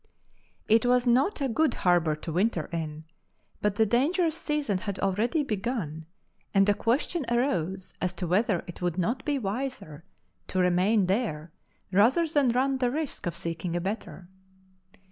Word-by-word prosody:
It 225 +1 +4
was 250 0 +3
not 260 +9 +2
a 275 - +1
good 265 +2 +1
harbour 175 -4 +2
to 155 +2 -7
winter 180 -3 +1
in, 155 -2 -4 0.6
but 210 -1 +1
the 220 +1 +3
dangerous 310 - +2
season 295 - -1
had 200 0 -4
already 220 - 0
begun, 195 - -3 0.5
and 195 0 +5
a 205 - +5
question 255 - 0
arose 190 - -1
as 180 - +1
to 185 - -4
whether 185 +1 +1
it 175 - -10
would 175 -1 -1
not 230 +9 -1
be 290 -2 0
wiser 205 - -4 0.4
to - - -4
remain 185 +3 +3
there 180 -6 -1 0.4
rather 230 - +4
than 290 -4 +2
run 260 +2 +1
the 250 -1 +2
risk 295 - -4
of 170 - -3
seeking 170 0 -4
a - - +1
better. 190 -1 -5
210 Hz, 160 wpm, -27 LUFS, 180-255 Hz, 0.6 s, and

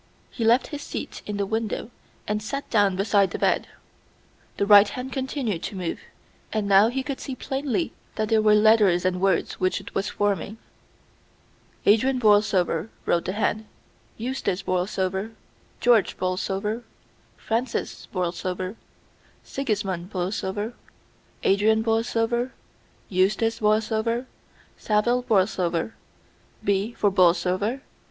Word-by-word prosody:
He 235 - -4
left 235 +3 +3
his 290 - -4
seat - - -6
in 210 -1 -3
the 200 - 0
window 220 +2 -3 0.4
and 210 0 -1
sat 275 +6 -4
down 205 -4 +3
beside 200 0 +2
the - - -4
bed. - - +1 0.9
The 200 - +1
right 205 0 +8
hand 255 +4 -6
continued 260 - -2
to 200 - -5
move, 180 -3 -3 0.5
and 215 -2 -1
now 200 +2 +6
he 260 +3 -2
could 275 -1 -4
see 265 - -5
plainly 275 +4 -2 0.2
that 215 -1 -1
they 225 -1 +4
were 215 0 +5
letters 210 -5 +4
and 185 0 0
words 195 -1 +1
which 185 0 +1
it - - -11
was 195 +1 -1
forming. 205 +1 -1 1.3
"Adrian 255 +6 +4
Borlsover," 205 -5 +3 0.2
wrote 170 - +1
the 185 - -2
hand, 215 +1 -1 0.5
"Eustace 220 -6 -2
Borlsover, 190 +3 -1 0.5
George 235 -4 +3
Borlsover, 195 +4 -2 0.6
Francis 230 +2 -3
Borlsover 185 +2 -3 0.7
Sigismund 195 -9 -3
Borlsover, 195 +3 -3 0.7
Adrian 220 +3 +3
Borlsover, 230 +2 0 0.5
Eustace 215 +5 +1
Borlsover, 220 +2 +1 0.5
Saville 235 +4 +1
Borlsover. 190 -5 +1 0.7
B, 200 +3 0
for 205 -3 +1
Borlsover. 185 +6 +2
210 Hz, 120 wpm, -25 LUFS, 190-230 Hz, 1.3 s, right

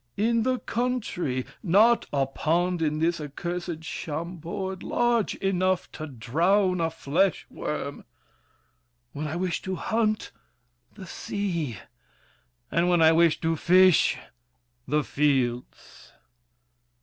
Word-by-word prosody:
In 230 +2 +2
the 255 +2 +1
country! 225 - -2 0.2
Not 220 +5 +4
a 140 -2 +1
pond 170 +6 0
In 155 -1 0
this 165 +1 0
accursed 170 +2 -5
Chambord 170 +4 -5
large 240 -3 +1
enough 185 -1 0
To 155 - -7
drown 170 - +1
a 165 - +1
flesh 165 +3 0
worm! - - -5 1.1
When 150 +2 -4
I 155 - -4
wish 180 0 -2
to 190 0 -3
hunt— 220 +1 -1 0.6
The 195 -3 -9
sea! 170 - -3 0.9
And 175 +1 +2
when 175 -2 +4
I 160 - +7
wish 165 -1 +4
to 165 0 +1
fish—the 125 -7 +1
fields! 130 -5 -2
170 Hz, 110 wpm, -26 LUFS, 150-190 Hz, 1.1 s, I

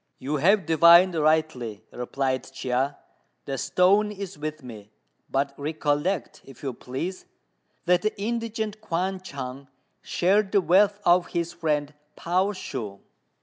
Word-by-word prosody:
"You 145 +3 -2
have 190 +5 +3
divined 170 +3 +7
rightly," 155 -9 0
replied 130 +1 -3
Chia; 130 +1 -1 0.5
"the 135 - -3
stone 185 +10 +3
is 200 -2 -7
with 155 0 -6
me; 110 -4 -10 0.4
but 140 +1 0
recollect, 150 +2 -1
if 135 0 -15
you 135 -2 -3
please, 135 +11 -6 0.6
that 180 0 +3
the 215 0 -2
indigent 220 -1 -3
Kuan 185 -1 -2
Chung 135 -5 -7 0.3
shared 195 +3 +1
the 200 - +5
wealth 200 +4 +4
of 175 0 +4
his 170 0 -3
friend 150 -3 -1 0.2
Pao 185 +4 0
Shu." 115 - -6
160 Hz, 130 wpm, -25 LUFS, 135-190 Hz, 0.6 s, divined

